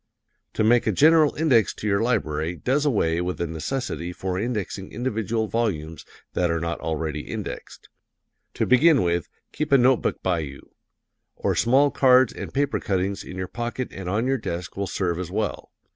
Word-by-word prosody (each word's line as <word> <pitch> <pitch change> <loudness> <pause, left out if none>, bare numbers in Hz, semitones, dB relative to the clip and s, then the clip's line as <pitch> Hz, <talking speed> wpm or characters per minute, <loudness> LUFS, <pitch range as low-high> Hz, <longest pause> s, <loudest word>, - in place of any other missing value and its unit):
To - - +1
make 115 +2 +4
a - - +4
general 155 - +5
index 140 -8 +3
to - - -8
your 100 -1 +2
library 85 -9 -1
does 140 - 0
away 85 - +1
with 90 -2 -3
the 85 - -1
necessity 85 - -4
for 95 +1 -3
indexing 105 -4 -3
individual 110 -2 -2
volumes 85 -9 -2 0.3
that 90 -1 +1
are 85 0 0
not 85 +1 -3
already 80 -1 -3
indexed. - - -7 0.7
To - - 0
begin 135 - +5
with, 85 -2 -1 0.2
keep 150 -1 -3
a 140 - +7
note 130 0 +5
book - - -2
by 90 -3 +1
you; 70 -3 -8 0.6
or - - 0
small 135 +4 +3
cards 130 -1 +5
and - - -7
paper 140 0 0
cuttings 95 0 -1
in 95 - -9
your 95 0 -3
pocket 120 +3 -4
and 95 -2 -6
on 105 +5 0
your 135 0 +1
desk 85 -4 -5
will 100 0 -2
serve 85 -3 -1
as 90 -2 -4
well. 105 +3 -3
105 Hz, 180 wpm, -24 LUFS, 85-125 Hz, 0.7 s, a